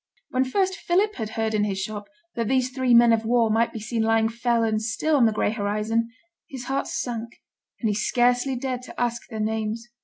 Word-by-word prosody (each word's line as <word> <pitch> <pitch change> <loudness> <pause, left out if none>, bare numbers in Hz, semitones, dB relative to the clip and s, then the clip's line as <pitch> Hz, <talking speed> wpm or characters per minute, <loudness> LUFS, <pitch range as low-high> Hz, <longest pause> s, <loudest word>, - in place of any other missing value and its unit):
When 255 +1 +2
first 375 +7 0
Philip 395 +5 +1
had 220 -3 -3
heard 220 0 0
in 210 -1 +2
his 195 -2 -1
shop 205 +1 -5 0.3
that 230 -2 -2
these 255 0 +1
three 255 -2 +2
men 235 0 +7
of 225 -1 +1
war 230 -1 +2
might 230 +2 +2
be 225 - -6
seen 220 +2 -2
lying 225 0 +3
fell 235 0 0
and 215 -1 0
still 230 +8 0
on 250 -5 +5
the - - +2
gray 210 - 0
horizon, 215 +2 -1 0.4
his 260 -3 -7
heart 270 +2 -2
sank, 235 -1 -4 0.5
and 230 - 0
he 210 - +1
scarcely 245 +4 +2
dared 250 0 -3
to 255 - -10
ask 235 -1 -1
their 220 - -6
names. 220 +1 -2
230 Hz, 215 wpm, -24 LUFS, 220-250 Hz, 0.5 s, men